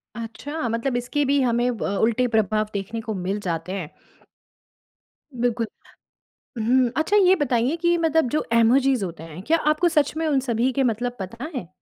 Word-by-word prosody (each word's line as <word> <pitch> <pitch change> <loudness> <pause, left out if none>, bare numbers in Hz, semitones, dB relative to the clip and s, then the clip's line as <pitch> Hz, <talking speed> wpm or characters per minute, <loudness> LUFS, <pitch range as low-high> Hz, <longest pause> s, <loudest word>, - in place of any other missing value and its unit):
अच्छा, 235 +5 -5
मतलब 230 +3 -1
इसके 270 +4 -1
भी 280 +1 +2
हमें 240 -1 +1
ब, - - -11
उल्टे 220 +5 +1
प्रभाव 215 -2 +1
देखने 205 +3 -4
को 220 -1 -4
मिल 190 +1 -3
जाते 170 -2 -4
हैं। 185 -6 -4 1.5
बिल्कुल। 235 -1 0 0.9
हुँ, 245 +2 +3
अच्छा 315 +7 +2
ये 375 -2 +6
बताइए 260 -1 +1
कि, 345 +1 +2
मतलब 320 -4 +2
जो 305 - 0
इमोजिस 250 +2 +4
होते 170 -4 -5
हैं, 165 +2 -9
क्या 325 +9 +2
आपको 325 +3 +2
सच 300 -2 +1
में 325 0 -1
उन 285 -3 +2
सभी 250 0 0
के 270 - +1
मतलब 245 +1 -1
पता 230 +8 -6
हैं? 185 -11 -5
240 Hz, 175 wpm, -23 LUFS, 220-285 Hz, 1.5 s, ये